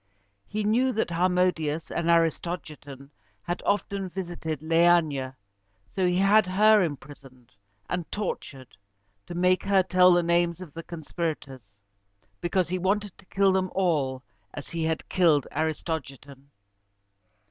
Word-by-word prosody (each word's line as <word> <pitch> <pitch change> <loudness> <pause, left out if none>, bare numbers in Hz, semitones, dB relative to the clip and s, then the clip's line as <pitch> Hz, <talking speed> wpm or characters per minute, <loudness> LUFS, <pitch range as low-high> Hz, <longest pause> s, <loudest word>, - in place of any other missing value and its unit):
He 215 0 -3
knew 240 +5 +2
that 215 -5 -1
Harmodius 170 -3 0
and 170 - -1
Aristogiton 155 -4 -1 0.3
had 175 +1 -4
often 200 -2 -1
visited 170 -5 -5
Leæna: 160 -5 +2 0.6
so 185 -2 +2
he 180 0 +1
had 200 +1 +4
her 210 +3 +5
imprisoned 135 -6 -7 0.3
and 180 -2 -4
tortured, 140 -10 -5 0.5
to 175 - -7
make 180 +1 +2
her 195 -1 +3
tell 185 0 +5
the 175 0 +3
names 170 0 +1
of 175 -6 -10
the 165 - -6
conspirators, 155 - -6 0.7
because 175 +1 0
he 185 +1 -2
wanted 200 +2 -1
to - - -18
kill 195 0 +2
them 190 0 0
all 145 -9 0 0.3
as 145 - -7
he 165 -1 -2
had 160 0 -2
killed 160 -7 +3
Aristogiton. 140 -3 -4
170 Hz, 130 wpm, -26 LUFS, 150-185 Hz, 0.7 s, her